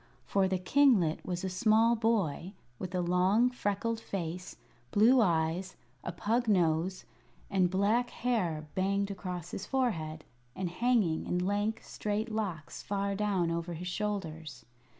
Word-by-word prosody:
For 195 Hz, -1 st, +2 dB
the 190 Hz, 0 st, 0 dB
kinglet 190 Hz, -, +3 dB
was 180 Hz, -1 st, -4 dB
a 190 Hz, -, -1 dB
small 220 Hz, +4 st, +3 dB
boy 200 Hz, -6 st, 0 dB, 0.3 s
with 185 Hz, 0 st, -5 dB
a 180 Hz, -, +1 dB
long, 185 Hz, +7 st, +3 dB
freckled 225 Hz, 0 st, -1 dB
face, 180 Hz, -4 st, -5 dB, 0.3 s
blue 235 Hz, +5 st, +5 dB
eyes, 170 Hz, -1 st, 0 dB, 0.3 s
a -, -, -3 dB
pug 225 Hz, +7 st, 0 dB
nose, 180 Hz, -2 st, +1 dB, 0.5 s
and 185 Hz, -2 st, +3 dB
black 210 Hz, +6 st, +2 dB
hair 180 Hz, -11 st, -1 dB
banged 200 Hz, +1 st, 0 dB
across 180 Hz, -3 st, -6 dB
his 195 Hz, -, -5 dB
forehead, 165 Hz, -, -1 dB, 0.3 s
and 185 Hz, -2 st, -3 dB
hanging 210 Hz, -6 st, +1 dB
in 180 Hz, -, 0 dB
lank, 205 Hz, +3 st, 0 dB
straight 215 Hz, +2 st, -3 dB
locks 190 Hz, -9 st, -4 dB
far 200 Hz, 0 st, -2 dB
down 195 Hz, -4 st, 0 dB
over 170 Hz, +1 st, -3 dB
his 180 Hz, +3 st, -6 dB
shoulders. 165 Hz, -9 st, -4 dB
190 Hz, 140 wpm, -31 LUFS, 175-215 Hz, 0.5 s, blue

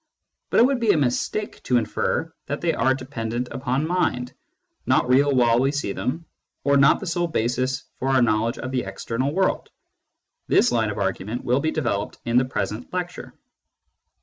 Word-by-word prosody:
But -, -, +3 dB
it -, -, +7 dB
would 270 Hz, -1 st, +1 dB
be 230 Hz, -2 st, 0 dB
a -, -, +1 dB
mistake 145 Hz, +10 st, -1 dB
to 125 Hz, -, +2 dB
infer 115 Hz, -3 st, -1 dB
that -, -, -3 dB
they -, -, +1 dB
are 130 Hz, 0 st, +2 dB
dependent 125 Hz, -2 st, -4 dB
upon 130 Hz, +2 st, -1 dB
mind, 125 Hz, -8 st, -1 dB, 0.5 s
not -, -, +3 dB
real 140 Hz, +3 st, +4 dB
while 120 Hz, -2 st, +4 dB
we 135 Hz, +2 st, +2 dB
see 145 Hz, -8 st, -2 dB
them, 130 Hz, -, -3 dB, 0.4 s
or 140 Hz, 0 st, +3 dB
not 140 Hz, +1 st, +5 dB
the -, -, -6 dB
sole 175 Hz, 0 st, 0 dB
basis 130 Hz, -2 st, -1 dB, 0.2 s
for 135 Hz, -, -1 dB
our 130 Hz, -1 st, +4 dB
knowledge 115 Hz, +1 st, +1 dB
of 130 Hz, -, -5 dB
the 130 Hz, -1 st, 0 dB
external 130 Hz, +4 st, -3 dB
world. 190 Hz, +4 st, 0 dB, 0.8 s
This -, -, +4 dB
line 115 Hz, -3 st, +1 dB
of 105 Hz, -, -5 dB
argument 100 Hz, +4 st, -2 dB
will 125 Hz, +2 st, +2 dB
be 155 Hz, -, 0 dB
developed 115 Hz, -10 st, -2 dB
in 120 Hz, +1 st, +3 dB
the 130 Hz, -, +1 dB
present 125 Hz, -2 st, -4 dB
lecture. 180 Hz, -1 st, -5 dB
130 Hz, 180 wpm, -23 LUFS, 120-145 Hz, 0.8 s, it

